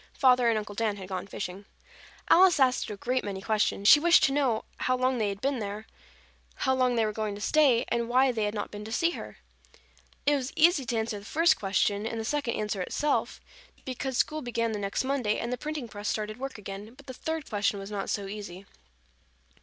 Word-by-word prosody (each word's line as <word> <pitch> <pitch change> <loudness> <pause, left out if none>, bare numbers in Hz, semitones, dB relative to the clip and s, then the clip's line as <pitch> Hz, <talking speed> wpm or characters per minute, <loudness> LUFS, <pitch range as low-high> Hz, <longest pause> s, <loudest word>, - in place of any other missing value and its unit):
Father 250 -3 +4
and 225 - +2
Uncle 210 -1 -5
Dan 210 -1 -1
had 190 -1 -9
gone 185 0 -4
fishing. 195 0 -6 0.6
Alice 360 -3 +6
asked 260 -1 +2
a 210 - -6
great 250 +4 -1
many 195 -2 -4
questions. 205 -1 0
She 295 - +9
wished 345 +3 +5
to 270 - +4
know 265 -6 +1
how 255 0 0
long 255 0 +1
they 210 -2 +1
had 200 0 -6
been 275 -2 0
there, 210 +1 -5 0.7
how 265 - +1
long 255 -1 +2
they 225 -1 +2
were 215 - -2
going 215 -1 -3
to - - -9
stay, 260 0 +3
and 235 0 -1
why 260 +2 +4
they 220 -3 -1
had 210 +1 -3
not 205 - -4
been 210 0 -7
to 220 - -8
see 335 +8 +2
her. - - -8 0.9
It 290 - +4
was 265 -1 -3
easy 320 -4 +4
to 230 - -1
answer 220 -1 -2
the 200 - -14
first 330 +8 +3
question 205 +1 0
and 225 - -4
the 220 - -4
second 285 -2 -1
answered 210 -2 -2
itself, 295 0 -1 0.5
because 260 0 -3
school 310 +3 0
began 230 -3 -1
the 210 - -3
next 200 +4 -2
Monday 260 -6 0
and 235 +2 -3
the - - +1
printing 300 -5 -4
press 205 -1 -7
started 215 +1 -3
work 270 -1 -5
again, 205 +3 -8
but - - -16
the 260 - -8
third 320 +3 -4
question 205 -1 0
was 195 +1 -8
not 200 -2 -3
so 200 - -2
easy. 195 -2 -8
230 Hz, 225 wpm, -28 LUFS, 205-265 Hz, 0.9 s, She